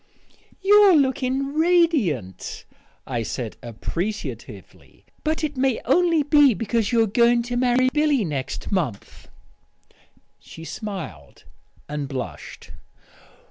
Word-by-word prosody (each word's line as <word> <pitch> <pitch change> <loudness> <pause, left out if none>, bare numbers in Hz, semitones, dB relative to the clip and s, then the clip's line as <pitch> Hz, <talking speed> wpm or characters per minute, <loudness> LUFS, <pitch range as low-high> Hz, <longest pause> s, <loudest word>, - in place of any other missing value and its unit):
"You're 405 -2 +6
looking 270 -1 0
radiant," 305 - +1 0.4
I 120 -3 -3
said 115 0 -5
appreciatively; 170 - -7 0.2
"but 315 +1 -1
it 300 -1 -2
may 260 -2 +1
only 335 +3 +3
be 290 -4 +5
because 225 0 -1
you're 230 -2 +3
going 235 +3 +3
to 245 +1 -4
marry 250 +1 +2
Billy 295 -7 +2
next 140 +2 -4
month." 155 - -3 1.1
She 160 - -12
smiled 170 - -8 0.4
and 145 -1 -4
blushed. 125 - -7
240 Hz, 100 wpm, -23 LUFS, -, 1.1 s, You're